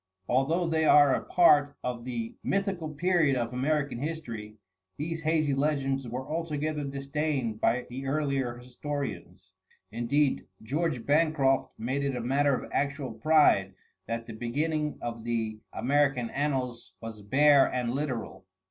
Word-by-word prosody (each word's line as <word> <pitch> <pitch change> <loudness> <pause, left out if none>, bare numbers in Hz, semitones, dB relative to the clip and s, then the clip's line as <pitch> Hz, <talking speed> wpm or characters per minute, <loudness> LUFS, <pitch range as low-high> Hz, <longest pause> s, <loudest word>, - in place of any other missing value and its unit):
Although 150 +8 +2
they 160 -1 +1
are 145 -3 +6
a - - -1
part 145 -5 +4
of 120 -1 -4
the 115 -3 -4
mythical 195 -5 -1
period 160 -2 +2
of 120 -1 -2
American 140 0 0
history, 120 -9 -5 0.4
these 165 +2 -3
hazy 155 -2 +1
legends 135 -2 0
were 125 +3 -5
altogether 155 -2 -2
disdained 140 -4 -2
by 125 +2 +2
the 135 +2 -6
earlier 135 -4 -1
historians; 120 - -6 0.4
indeed, 130 +5 0 0.2
George 140 0 -1
Bancroft 145 -3 +2
made 130 +5 -2
it 140 -2 -1
a - - -2
matter 140 +3 +2
of - - -6
actual 140 -2 -1
pride 110 -6 +3 0.3
that 115 0 -3
the 115 - -8
beginning 150 +7 -2
of 115 -1 -5
the 115 -2 -2
American 135 -3 +1
annals 130 -4 -2
was 115 -2 -8
bare 140 +6 +5
and 125 -2 -1
literal. 120 -9 -4
135 Hz, 140 wpm, -28 LUFS, 120-150 Hz, 0.4 s, are